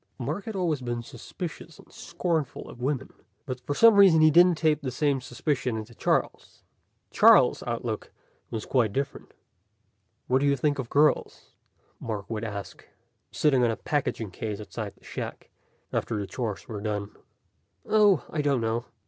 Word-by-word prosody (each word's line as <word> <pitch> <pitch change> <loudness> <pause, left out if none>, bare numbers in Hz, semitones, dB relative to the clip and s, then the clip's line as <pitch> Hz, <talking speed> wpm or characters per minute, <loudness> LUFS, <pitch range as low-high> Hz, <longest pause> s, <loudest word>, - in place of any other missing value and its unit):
Mark 150 - -4
had 220 -2 -5
always 165 -7 0
been 120 -1 -3
suspicious 160 +7 -8
and - - -18
scornful 160 -6 -3
of 120 - -12
women. 135 0 -2 0.3
But 130 -1 -5
for 145 +3 -3
some 230 +5 +7
reason 190 -5 +7
he 155 0 +6
didn't 175 +1 +6
tape 155 -2 +2
the 135 - -3
same 140 +1 0
suspicion 125 -2 -2
into 110 +2 -7
Charles. - - -2 0.5
Charles' - - +6
outlook - - -4 0.4
was 110 -2 -5
quite 115 -6 +1
different. 140 +3 -4 0.9
"What 130 +1 +2
do 145 - +1
you 140 0 +2
think 145 +2 0
of 120 -3 -4
girls?" 150 +1 +1 0.5
Mark 105 -3 -5
would 110 0 -3
ask, 100 -3 -6 0.5
sitting 135 -5 +2
on 120 - +3
a 115 - -2
packing 125 -8 -2
case 105 +2 -5
outside 105 - -6
the - - -28
shack, - - -7 0.4
after 110 - -1
the 100 - -3
chores 110 -2 -5
were 105 -3 -6
done. 105 -1 -3 0.7
"Oh, 205 - +4
I 155 - -1
don't 140 -3 +1
know. 115 +1 -1
130 Hz, 165 wpm, -27 LUFS, 115-155 Hz, 0.9 s, some